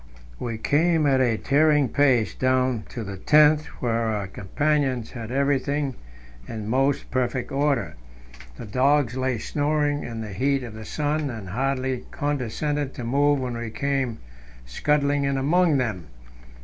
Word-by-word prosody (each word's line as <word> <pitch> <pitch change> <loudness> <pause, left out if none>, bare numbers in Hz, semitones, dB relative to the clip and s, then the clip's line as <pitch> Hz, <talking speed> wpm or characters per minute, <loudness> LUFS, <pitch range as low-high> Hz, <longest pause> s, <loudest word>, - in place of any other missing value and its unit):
We 115 -2 -3
came 160 +6 +2
at 135 -2 +3
a 120 -3 +2
tearing 150 +1 +3
pace 125 - +2
down 130 -3 +1
to 115 - -5
the 100 -2 -6
tent, 150 +6 +5 0.2
where 120 - +1
our 110 -3 -1
companions 130 +6 -1
had 115 -3 -7
everything 140 +1 0 0.5
in 110 -2 -6
most 135 +4 0
perfect 130 0 -1
order. 135 - 0 0.6
The - - -7
dogs 130 +3 +2
lay 130 -1 0
snoring 145 +3 0
in 115 -1 -6
the 105 -3 -6
heat 135 +6 0
of 120 -3 -7
the 110 0 -9
sun, 150 +2 -1
and 110 -6 -7
hardly 130 +3 -1
condescended 145 +1 -2
to 125 - -6
move 140 +4 +2
when 125 -2 -3
we 115 -1 -4
came 135 -1 -1 0.5
scudding 145 - +1
in 140 0 0
among 155 +3 +3
them. 105 - -2
130 Hz, 150 wpm, -24 LUFS, 115-145 Hz, 0.6 s, tent